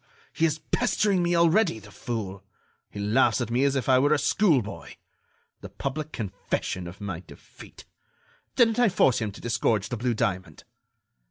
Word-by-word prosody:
he 165 - +2
is 155 -1 -2
pestering 205 0 0
me 175 0 +1
already, 170 - +3
the 105 -1 -13
fool! 100 -4 -5 0.5
He 100 - -9
laughs 105 +8 +2
at 120 -2 -3
me 125 +3 +2
as 140 0 +1
if 130 -4 -2
I 130 -1 +5
were 145 +3 +3
a - - +1
schoolboy! 140 - 0 0.6
The - - -10
public 155 +3 -5
confession 95 -3 -4
of 90 +3 -10
my 100 -5 -4
defeat! 90 - -15 0.7
Didn't 230 -1 +3
I 240 -3 +5
force 135 - +3
him 110 -3 -3
to 100 - -13
disgorge 115 -3 0
the 120 - -3
blue 120 +1 -1
diamond?" 95 -3 -3
125 Hz, 170 wpm, -26 LUFS, 105-160 Hz, 0.7 s, I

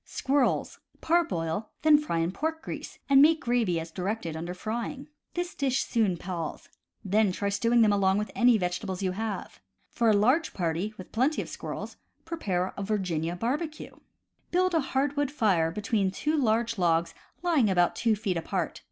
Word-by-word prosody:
Squirrels. 275 -1 0
— - - -33
Parboil, 205 - +1
then 305 -1 +7
fry 300 - -2
in 165 +1 0
pork 320 +10 -3
grease, - - -7
and 275 -1 +7
make 315 +2 +6
gravy 235 - +1
as 165 0 -7
directed 185 -2 -3
under 170 +3 -5
Frying. 235 +8 -4 0.3
This 350 0 -2
dish 270 -2 0
soon 215 -7 +1
palls. 170 -2 -5 0.4
Then 205 +1 +3
try 200 +2 -2
stewing 230 +4 +3
them 210 -2 +4
along 195 -1 +3
with 210 +1 -2
any 240 -1 +5
vege 180 -2 -1
tables 190 -2 -5
you 185 - +1
may 185 - -8
have. 220 -2 -4 0.3
For 235 -1 +2
a - - +5
large 255 +11 +2
party, 175 +3 -1
with 185 - -10
plenty 260 +7 +1
of - - -11
squirrels, - - -6 0.3
prepare 195 - -2
a - - -5
Virginia 180 -5 -1
Barbecue. 300 - -3 0.3
— - - -46
Build 370 +1 +2
a 325 - +4
hardwood 285 +1 0
fire 200 - +2
between 205 +1 0
two 300 +11 -1
large 230 -5 +1
logs 170 -1 +2 0.3
lying 310 - +3
about 175 -2 +2
two 230 -2 +2
feet 200 -4 -2
apart. 165 - -3
215 Hz, 180 wpm, -28 LUFS, 180-275 Hz, 0.4 s, then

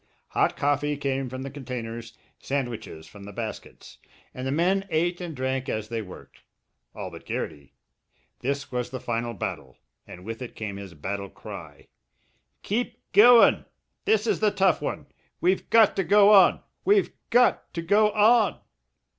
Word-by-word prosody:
Hot - - +1
coffee 145 +1 0
came 135 -2 -2
from 130 +1 -6
the 135 - -6
containers, 120 -4 -7 0.2
sandwiches 120 - -4
from 100 -1 -13
the 100 - -9
baskets, 110 +1 -8 0.3
and 130 +1 -5
the - - -1
men 180 +6 +2
ate 175 +2 0
and 170 -3 -6
drank 130 +1 -2
as 110 0 -3
they 115 -1 -3
worked 95 -4 -13 0.5
all - - -6
but - - -11
Garrity. 70 -1 -6 0.6
This 140 +2 -3
was 125 -1 -2
the 130 0 -6
final 120 -1 -3
battle, - - -6 0.3
and 90 +1 -11
with 115 +2 -6
it 125 - -7
came 105 -3 -5
his 95 -3 -9
battle 100 +5 -5
cry: - - -11 0.8
"Keep 235 +2 -3
goin'! 230 +4 +7 0.4
This 220 0 +2
is - - +1
the 215 - +3
tough 190 -4 +2
one - - -4 0.3
we've 185 +2 +1
got 225 -2 +5
to 195 - +2
go 205 +4 +6
on 195 -3 +6 0.2
we've 405 0 +3 0.2
got 245 +1 +3
to 170 - -3
go 210 +5 +4
on!" 215 0 +4
135 Hz, 160 wpm, -26 LUFS, 115-195 Hz, 0.8 s, goin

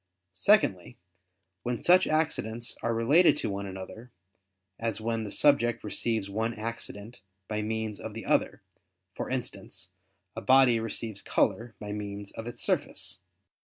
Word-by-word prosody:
Secondly, 100 - +3 0.6
when 120 -1 -3
such 185 +2 +6
accidents 120 -7 0
are 115 - 0
related 135 +10 +5
to - - -2
one 100 0 -4
another; 95 +6 -9 0.7
as 115 -2 -2
when 115 0 -2
the 105 - -6
subject 120 -5 +3
receives 110 0 -1
one 110 +3 -2
accident 110 0 -5 0.3
by 105 0 -2
means 110 -1 -3
of - - -7
the - - -6
other; - - +1 0.5
for - - -5
instance, - - -5 0.4
a - - -4
body 130 -3 +5
receives 110 -2 -3
color 115 -1 0
by 105 -1 -6
means 100 -1 -5
of 115 - -7
its 120 0 -5
surface. - - -1
115 Hz, 140 wpm, -29 LUFS, 105-120 Hz, 0.7 s, such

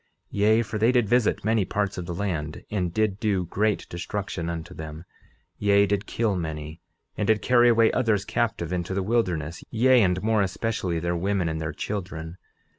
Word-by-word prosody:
11:33 - - -3
Yea, 110 +2 +5
for 110 -1 -4
they 115 +3 +4
did 120 -4 +2
visit 120 -2 +2
many 110 -1 +3
parts 100 +2 -1
of 90 -2 -5
the 85 - -4
land, 80 -6 -3
and 90 -5 -1
did 105 +1 0
do 100 -5 0
great 105 +4 0
destruction 85 -1 -4
unto 85 0 -5
them; 80 +1 -8 0.5
yea, 100 0 +4
did 100 0 -1
kill 110 -4 0
many, 80 -2 -5 0.3
and 105 - -1
did 110 -1 +2
carry 120 -1 +5
away 115 -1 +5
others 110 -6 +1
captive 95 -8 -1
into 90 +1 -2
the 95 - 0
wilderness, 90 -8 -1
yea, 125 +2 +4
and 90 -2 +1
more 110 -1 +2
especially 95 -2 -1
their 85 +1 -1
women 95 0 0
and 80 -1 -3
their 80 0 -2
children. 90 -5 -5
100 Hz, 190 wpm, -25 LUFS, 85-110 Hz, 0.5 s, Yea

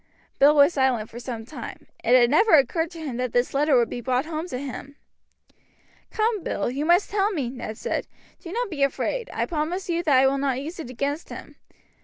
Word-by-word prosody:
Bill 290 +2 +6
was 290 +3 +6
silent 260 -6 +1
for 235 - -8
some 235 -2 -6
time, 255 -2 -9 0.2
It 240 +2 +4
had 240 0 +4
never 415 +6 +5
occurred 320 +4 +2
to 335 -1 -11
him 280 -7 -5
that 250 -1 -2
this 245 +1 +1
letter 285 -1 +3
would 235 -1 +3
be 240 - -4
brought 255 +3 0
home 320 +1 -4
to 255 - -4
him. 275 +1 -7 1.1
"Come, 435 -2 0
Bill, 200 +4 -2
you 280 +4 -2
must 350 +3 +3
tell 405 0 +2
me," 285 - -2
Ned 235 -4 -7
said. - - -3 0.3
"Do 340 - -9
not 470 0 -2
be 295 -4 -4
afraid. 455 - -1
I - - -1
promise 345 +3 -3
you 340 0 0
that 300 -6 +3
I 265 - +5
will 275 +1 +2
not 270 -2 0
use 320 +6 -7
it 310 - -6
against 280 +5 -3
him. - - -10
280 Hz, 220 wpm, -24 LUFS, 250-335 Hz, 1.1 s, Bill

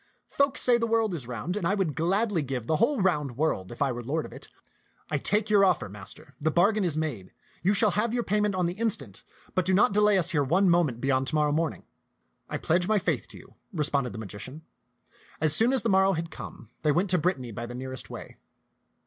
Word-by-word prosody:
Folk 280 0 +1
say 245 -1 +4
the 230 - 0
world 225 -3 +1
is 140 -8 -5
round, 125 - -4
and 180 -5 -1
I 200 - +1
would 190 -7 -1
gladly 190 +3 0
give 130 -4 -4
the 155 +5 +1
whole 255 - +2
round 150 -9 0
world 135 -12 -1
if 120 - -2
I 135 - 0
were 120 0 -5
lord 150 +6 -2
of - - -11
it. - - -11 0.6
I 145 - 0
take 210 +8 +1
your 205 -2 +4
offer, 185 - +2
master; 105 +7 -5
the 155 - +2
bargain 200 +6 +2
is 165 -4 +1
made. 130 -13 -4 0.3
You 200 +4 +2
shall 210 0 +4
have 210 +4 0
your 240 0 -1
payment 210 -1 0
on 180 -1 0
the 170 - -1
instant; 185 - -2 0.3
but 185 - +1
do 185 +1 +1
not 200 0 +4
de 210 - +3
lay 210 -1 +4
us 175 -1 +2
here 150 -5 +2
one 180 +7 +3
moment 150 -9 +1
beyond 135 -1 +1
to 155 - -1
morrow 150 -1 +2
morning." 160 +2 -1 0.7
"I - - -2
pledge 175 +2 +1
my 215 - +3
faith 195 - -1
to - - -12
you," - - -16 0.2
responded 145 - 0
the 100 - -8
magician. 110 - -8 0.8
As 155 -1 +3
soon 230 +3 +4
as 265 - +2
the - - 0
morrow 190 0 +4
had 165 -1 -4
come, 115 - -10
they 150 - +2
went 180 +5 +2
to 180 - +4
Brittany 150 -8 -1
by 115 +3 -6
the 120 - -8
nearest 130 0 -5
way. - - -9
170 Hz, 235 wpm, -27 LUFS, 135-200 Hz, 0.8 s, say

